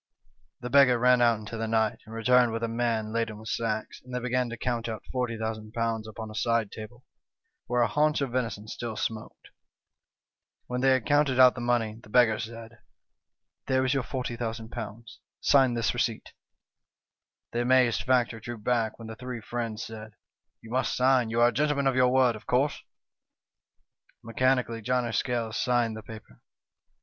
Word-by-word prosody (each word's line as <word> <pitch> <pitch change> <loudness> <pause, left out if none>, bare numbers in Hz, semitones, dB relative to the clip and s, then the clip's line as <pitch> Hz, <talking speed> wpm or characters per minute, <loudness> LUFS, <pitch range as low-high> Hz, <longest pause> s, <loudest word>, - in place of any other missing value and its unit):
" - - -42
The 125 - -5
beggar 135 -2 +6
ran 125 +1 +4
out 120 -2 +4
into 110 +2 -7
the 115 0 -2
night, 110 -1 +1
and 110 - -9
returned 125 +1 +4
with 115 +1 -3
a - - +1
man 115 -2 -1
laden 115 -2 -1
with 110 +1 -9
sacks, 110 -2 -3
and 125 - -13
they - - 0
began 125 0 -1
to 120 - -6
count 120 -1 -2
out 110 -1 -5
^40,000 115 -2 -2
upon 110 0 -8
a - - -9
side 115 -1 0
table, 115 +3 -10 0.6
where 125 0 +2
a - - +2
haunch 150 0 +2
of 140 -3 -2
venison 115 -4 -3
still 115 0 -5
smoked. 110 0 -5 0.6
" - - -61
When 125 0 -3
they 135 - +4
had 130 -4 +2
counted 145 -3 +2
out 125 -1 +8
the 120 - -7
money, 115 -2 0
the 105 - -16
beggar 110 -2 +4
said: 115 0 -8 0.4
" - - -58
'There 130 0 +2
is 130 - +1
your 135 - +1
^40,000; 115 -3 -5 0.4
sign 135 -3 +4
this 115 -1 0
receipt.' 120 -2 -2 1.2
"The 120 - -1
amazed 125 -1 +3
factor 125 -3 +1
drew 120 +2 -7
back, 115 0 -1
when 115 - -9
the 110 - -7
three 125 0 -6
friends 115 -1 -4
said: 110 -1 -9 0.2
" - - -64
' - - -58
You 115 - -11
must 130 +2 0
sign; 125 -2 +3
you 115 +1 0
are 120 - +6
a - - -6
gentleman 150 -1 +1
of 135 -1 +2
your 125 -1 +4
word, 130 -3 +3
of 110 - -12
course.' 135 +4 +1 0.7
" - - -43
Mechanically 120 0 0
John 125 +2 0
o' 115 - -3
Scales 115 -2 -1
signed 120 -3 +1
the 110 - -7
paper. 110 - -12
120 Hz, 190 wpm, -27 LUFS, 110-125 Hz, 1.2 s, out